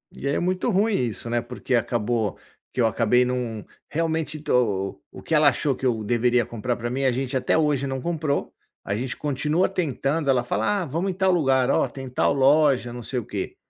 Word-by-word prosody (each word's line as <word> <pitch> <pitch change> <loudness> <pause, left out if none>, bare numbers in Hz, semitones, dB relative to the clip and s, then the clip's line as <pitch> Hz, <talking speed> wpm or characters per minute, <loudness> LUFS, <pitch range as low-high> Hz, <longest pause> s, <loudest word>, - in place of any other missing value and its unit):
E 140 - -5
é 140 - +1
muito 185 +5 0
ruim 210 +1 +2
isso 120 - -2
né 120 0 +1
porque 125 0 -5
acabou 115 -2 0 0.3
que - - -6
eu - - +4
acabei 120 +2 +3
num 125 -4 -3 0.2
realmente 160 -1 -1
do 150 - -3 0.6
o - - -10
o - - -11
que - - -3
ela 150 -2 +6
achou 140 +1 0
que 130 - -15
eu 115 -3 +1
deveria 120 +2 +2
comprar 120 +2 -3
pra 120 0 -3
mim 135 +2 -2
a 130 - +3
gente 130 +2 -3
até 130 - +2
hoje 145 -3 +1
não 135 0 -3
comprou. 155 -3 -2 0.3
A 100 - -2
gente 125 +3 -3
continua 150 +5 +1
tentando. 150 -4 -1
Ela 125 -2 +3
fala: 120 - 0
"Ah - - -4
vamos 165 +7 -2
em - - -5
tal 190 0 +2
lugar". 135 -7 +3
"Olha, - - +2
tem 135 -1 -8
tal 125 - +1
loja 135 -3 +3
não 120 - -7
sei 125 - -4
o 115 - -7
quê". - - -5
135 Hz, 220 wpm, -24 LUFS, 120-155 Hz, 0.6 s, ela